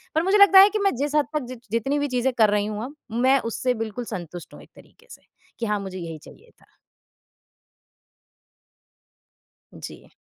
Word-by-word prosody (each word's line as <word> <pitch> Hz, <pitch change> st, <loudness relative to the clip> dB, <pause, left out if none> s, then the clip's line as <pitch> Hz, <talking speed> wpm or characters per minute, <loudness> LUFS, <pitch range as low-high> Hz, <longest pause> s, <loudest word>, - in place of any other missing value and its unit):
पर 320 Hz, -, +2 dB
मुझे 390 Hz, +3 st, +3 dB
लगता 400 Hz, -1 st, +8 dB
है 395 Hz, +2 st, +8 dB
कि 430 Hz, -, -3 dB
मैं 395 Hz, -1 st, +2 dB
जिस 290 Hz, +3 st, -3 dB
हद 295 Hz, -, +3 dB
तक 300 Hz, -, -1 dB
जि 255 Hz, -, -7 dB, 0.2 s
जितनी 270 Hz, +6 st, -1 dB
भी 290 Hz, -, -1 dB
चीजें 255 Hz, 0 st, 0 dB
कर 220 Hz, -3 st, +3 dB
रही 205 Hz, 0 st, 0 dB
हूँ 215 Hz, +1 st, -5 dB
अब, 285 Hz, +3 st, -11 dB, 0.2 s
मैं 260 Hz, +4 st, +3 dB
उससे 245 Hz, +2 st, -2 dB
बिल्कुल 230 Hz, +2 st, -6 dB
संतुष्ट 175 Hz, -3 st, -8 dB
हूँ -, -, -13 dB
एक -, -, -18 dB
तरीक़े 475 Hz, -, -20 dB
से -, -, -13 dB, 0.4 s
कि 230 Hz, -, -2 dB
हाँ, 210 Hz, -1 st, -1 dB
मुझे 190 Hz, -1 st, -7 dB
यही 165 Hz, -2 st, -7 dB
चाहिए -, -, -17 dB
था। -, -, -28 dB, 3.0 s
जी। -, -, -12 dB
250 Hz, 185 wpm, -23 LUFS, 210-295 Hz, 3.0 s, लगता